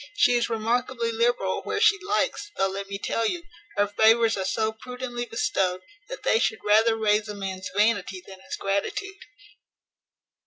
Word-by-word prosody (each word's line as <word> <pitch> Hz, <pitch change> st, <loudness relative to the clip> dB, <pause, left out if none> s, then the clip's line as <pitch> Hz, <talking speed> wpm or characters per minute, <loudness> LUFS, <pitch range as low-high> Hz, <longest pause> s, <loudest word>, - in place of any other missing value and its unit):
She 245 Hz, -, +4 dB
is 240 Hz, -1 st, +1 dB
remarkably 235 Hz, +1 st, -1 dB
liberal 230 Hz, -4 st, 0 dB
where -, -, -2 dB
she 415 Hz, -3 st, +5 dB
likes; 410 Hz, +2 st, -1 dB
though, 195 Hz, -, +2 dB
let 195 Hz, +1 st, -5 dB
me 200 Hz, -, -4 dB
tell 230 Hz, +3 st, -1 dB
you, 345 Hz, +8 st, -3 dB, 0.3 s
her 205 Hz, -, +4 dB
favours 225 Hz, +2 st, +4 dB
are 190 Hz, -, -2 dB
so 220 Hz, +3 st, 0 dB
prudently 245 Hz, +1 st, -6 dB
bestowed, 195 Hz, -8 st, 0 dB, 0.3 s
that -, -, -7 dB
they 220 Hz, -, +3 dB
should 220 Hz, -, -1 dB
rather 220 Hz, +2 st, +4 dB
raise 210 Hz, -1 st, +1 dB
a 210 Hz, -, -5 dB
man's 190 Hz, -1 st, -5 dB
vanity 205 Hz, -3 st, +2 dB
than 190 Hz, -1 st, -12 dB
his -, -, -6 dB
gratitude." 285 Hz, -, -3 dB
220 Hz, 165 wpm, -25 LUFS, 200-245 Hz, 0.3 s, she